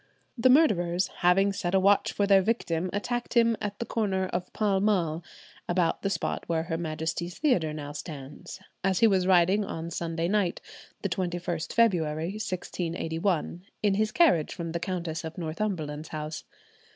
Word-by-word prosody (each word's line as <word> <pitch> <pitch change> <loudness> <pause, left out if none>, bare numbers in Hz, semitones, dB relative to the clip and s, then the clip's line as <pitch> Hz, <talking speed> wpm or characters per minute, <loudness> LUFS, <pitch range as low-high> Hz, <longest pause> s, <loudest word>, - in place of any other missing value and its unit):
The 255 0 +3
murderers, 185 - +3
having 195 +3 +3
set 195 -2 -1
a - - +5
watch 200 +1 +3
for 205 - +1
their 195 -1 +6
victim, 185 -5 -1
attacked 240 +5 -3
him 230 -1 +5
at 205 -1 -3
the 235 - -3
corner 195 -5 0
of 180 0 -3
Pall 205 -3 +1
Mall, 175 -6 +1 0.5
about 175 -1 +1
the 195 - 0
spot 175 -4 -2
where 165 -1 +1
Her 165 -1 -3
Majesty's 165 +2 -3
Theatre 190 - +2
now 145 -1 -6
stands, 145 -2 -8 0.2
as 190 -1 +1
he - - +7
was 190 -4 +3
riding 190 +3 +4
on 165 -3 -5
Sunday 165 0 -2
night, 195 -2 +1 0.4
the 200 - 0
21st 175 -2 -2
February, 165 -8 +2
1681, 175 -3 -2 0.2
in 205 -2 +3
his 215 +2 +1
carriage 260 - +3
from 170 -3 -4
the 170 - -2
Countess 170 -3 -3
of 160 0 -7
Northumberland's 160 -3 -3
house. 155 0 -5
180 Hz, 165 wpm, -28 LUFS, 165-200 Hz, 0.5 s, he